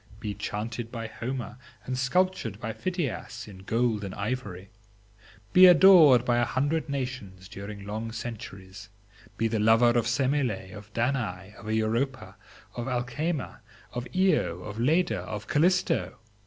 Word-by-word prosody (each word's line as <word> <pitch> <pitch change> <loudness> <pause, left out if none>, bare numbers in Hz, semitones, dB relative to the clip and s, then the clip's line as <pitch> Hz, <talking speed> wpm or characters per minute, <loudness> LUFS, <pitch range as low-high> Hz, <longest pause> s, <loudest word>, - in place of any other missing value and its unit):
be 105 -2 -4
chanted 115 +3 -5
by 115 -2 -5
Homer, 120 +2 -5 0.3
and 130 - -3
sculptured 125 - 0
by 115 -1 -4
Phidias 140 - -4
in 100 -3 -11
gold 110 +2 0
and 95 - -6
ivory; 100 -3 -4 0.8
be 185 0 +9
adored 165 -9 +8
by 120 -1 +2
a - - +3
hundred 145 +6 -1
nations 125 -9 -5
during 100 0 -8
long 110 +2 -4
centuries; 105 -3 -8 0.5
be 115 - +1
the 110 -1 -1
lover 115 +3 +5
of 120 -1 +1
Semele, 125 -6 0
of 105 +1 -11
Danae, 115 -6 -2
of 110 +1 -7
Europa, 115 +5 -1 0.4
of 120 +1 -5
Alcmena, 130 +5 -2 0.3
of 125 0 -4
Io, 175 - +2
of 105 +1 -7
Leda, 155 - +2
of 105 +4 -6
Calisto! 180 +5 +1
115 Hz, 140 wpm, -27 LUFS, 105-130 Hz, 0.8 s, be